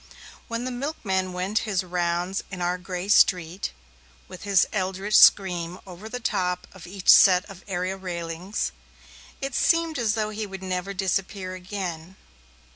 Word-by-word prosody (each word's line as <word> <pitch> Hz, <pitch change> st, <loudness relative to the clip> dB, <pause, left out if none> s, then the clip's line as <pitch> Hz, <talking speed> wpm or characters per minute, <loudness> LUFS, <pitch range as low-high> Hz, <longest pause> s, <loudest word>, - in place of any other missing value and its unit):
When 230 Hz, +1 st, -3 dB
the 255 Hz, -, -3 dB
milkman 225 Hz, -9 st, -2 dB
went 185 Hz, +4 st, -1 dB
his 190 Hz, -3 st, 0 dB
rounds 175 Hz, +1 st, -1 dB
in 185 Hz, -, -7 dB
our 180 Hz, +1 st, -1 dB
grey 180 Hz, +1 st, -5 dB
street, 180 Hz, -3 st, +3 dB, 0.6 s
with 185 Hz, -, -10 dB
his 200 Hz, -2 st, +4 dB
eldritch 195 Hz, +1 st, -1 dB
scream 180 Hz, -3 st, +5 dB
over 190 Hz, +3 st, -10 dB
the 250 Hz, +2 st, -5 dB
top 180 Hz, -6 st, -1 dB
of 185 Hz, -2 st, -12 dB
each 190 Hz, 0 st, -9 dB
set 185 Hz, 0 st, +7 dB
of 195 Hz, -2 st, -12 dB
area 185 Hz, 0 st, -2 dB
railings, 175 Hz, +1 st, -4 dB, 0.7 s
it 275 Hz, -1 st, -3 dB
seemed 330 Hz, 0 st, +2 dB
as 220 Hz, -2 st, +1 dB
though 215 Hz, -1 st, -1 dB
he 215 Hz, 0 st, -4 dB
would 195 Hz, -1 st, -8 dB
never 185 Hz, +1 st, -3 dB
disappear 190 Hz, 0 st, -2 dB
again. 185 Hz, -2 st, -6 dB
190 Hz, 150 wpm, -25 LUFS, 180-205 Hz, 0.7 s, set